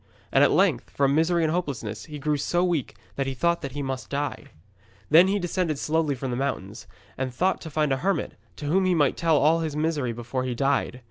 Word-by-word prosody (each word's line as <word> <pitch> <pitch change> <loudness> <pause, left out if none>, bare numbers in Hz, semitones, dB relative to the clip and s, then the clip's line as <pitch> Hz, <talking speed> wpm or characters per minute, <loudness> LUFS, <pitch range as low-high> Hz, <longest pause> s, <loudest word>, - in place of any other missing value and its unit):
And - - +5
at - - +6
length, - - +2
from 140 -1 +1
misery 165 +2 +2
and 155 0 +1
hopelessness, 125 - -3
he 150 -2 -8
grew 150 +1 0
so 175 +5 0
weak 170 -7 -1 0.2
that 135 -1 -1
he 135 - -3
thought 170 +6 +1
that 140 -4 -6
he 145 0 -3
must 135 -1 -4
die. 145 +1 -3 0.7
Then 170 +4 +8
he 200 +2 +1
descended 175 -4 -1
slowly 155 -1 0
from 130 0 -4
the 120 - -2
mountains, 115 -7 -4 0.3
and 130 -1 -2
thought 185 +10 0
to 160 - -7
find 150 -1 0
a - - 0
hermit, 195 +7 -1 0.2
to 145 - -8
whom 185 +6 +2
he 185 -1 +3
might 145 -4 +2
tell 165 -2 +2
all 155 +3 +4
his 160 -3 -3
misery 150 -5 0
before 120 +2 -4
he 125 -1 -2
died. 135 -1 0
145 Hz, 225 wpm, -25 LUFS, 135-165 Hz, 0.7 s, Then